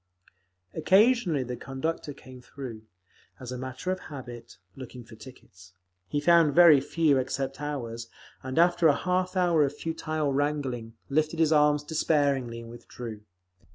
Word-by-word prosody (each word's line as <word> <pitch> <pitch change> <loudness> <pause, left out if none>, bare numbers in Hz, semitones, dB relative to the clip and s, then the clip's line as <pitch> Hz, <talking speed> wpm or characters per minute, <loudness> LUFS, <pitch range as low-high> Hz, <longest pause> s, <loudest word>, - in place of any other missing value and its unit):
Occasionally 190 - +3
the 125 0 -5
conductor 145 +5 -4
came 130 -2 -13
through, 120 -5 -9 0.5
as 130 -1 -8
a 125 - -4
matter 130 +7 -4
of 185 - -2
habit, 120 -7 -10 0.2
looking 125 -1 -10
for 115 - -16
tickets. 95 -6 -15 0.3
He 145 - -1
found 165 -1 +4
very 165 -5 +8
few 150 -1 +2
except 135 +1 -3
ours, 120 -6 -5 0.3
and 130 +2 -6
after 175 0 +4
a 145 - +4
half 185 +1 -1
hour 170 -4 +3
of 145 +1 -2
futile 155 -3 -2
wrangling, 135 -5 -2
lifted 155 +3 0
his 160 -1 +3
arms 150 -1 +3
despairingly 140 -6 0
and 115 0 -11
withdrew. 115 -2 -9
140 Hz, 145 wpm, -27 LUFS, 125-160 Hz, 0.5 s, very